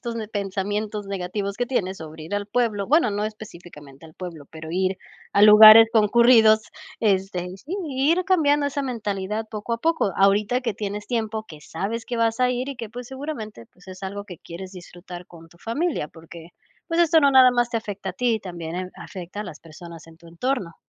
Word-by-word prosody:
estos 235 -2 -5
ne 215 -2 -5
pensamientos 205 +1 -3
negativos 195 +1 -4
que 245 - 0
tienes 195 -7 -2
sobre 155 -1 -10
ir 190 +5 -5
al 205 - -1
pueblo 215 -3 -1
bueno, 300 -5 +3
no 205 +1 -2
específicamente 170 -9 -10
al 160 - -14
pueblo, 170 -4 -9
pero 160 0 -9
ir 185 +1 -1 0.3
a - - +3
lugares 215 +2 +10
concurridos, 220 0 +5 0.4
este, 190 -4 0
y 185 +1 -8
sí, 300 - -7
ir 295 +7 +1
cambiando 295 -6 +3
esa 285 0 -2
mentalidad 215 -3 -3
poco 215 +2 -5
a 230 - -1
poco. 320 -9 0
Ahorita 205 +5 +2
que 235 -6 -3
tienes 205 0 -5
tiempo, 220 -2 -3
que 155 -2 -12
sabes 210 +10 -4
que 240 -2 -4
vas 230 0 +1
a 250 0 +3
ir 250 +2 -3
y 275 - -6
que, 230 -3 -7
pues, 245 +1 -8
seguramente, 265 - -7
pues, 180 +1 -20
es 185 +1 -11
algo 200 +1 -5
que 180 - -9
quieres 185 +4 -10
disfrutar 175 -1 -11
con 165 -3 -15
tu 170 - -22
familia, 250 - -2
porque, 165 +1 -13 0.4
pues, 330 +1 0
esto 330 -1 +5
no 280 - +4
nada 260 -1 +7
más 240 -1 0
te 230 - 0
afecta 205 -3 -6
a - - -11
ti, 225 +3 0
también 170 -3 -7
en 185 0 -5
afecta 185 +1 -8
a - - -5
las 165 -6 -9
personas 165 0 -12
en 165 0 -17
tu 170 - -16
entorno. 185 0 -3
205 Hz, 205 wpm, -23 LUFS, 180-235 Hz, 0.4 s, lugares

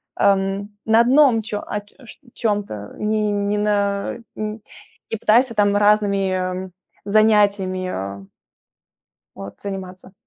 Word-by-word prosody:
ам, 195 +1 +1 0.2
на 225 +1 +5
одном 255 -1 +4
чё 210 -1 -4
а, 210 - -2
чт 235 +4 -16
чём-то, 205 - -1 0.3
не 210 0 0
не 205 0 -1
на, 205 -1 0 0.2
э, 215 +1 -4 0.5
и - - 0
пытайся 235 +2 +4
там 205 -1 +3
разными, 205 -2 +2
м, 185 0 -3 0.3
занятиями, 205 -3 +3
э 100 - -5 1.1
вот, 100 0 -9
заниматься". 190 -1 -7
205 Hz, 115 wpm, -21 LUFS, 195-215 Hz, 1.1 s, на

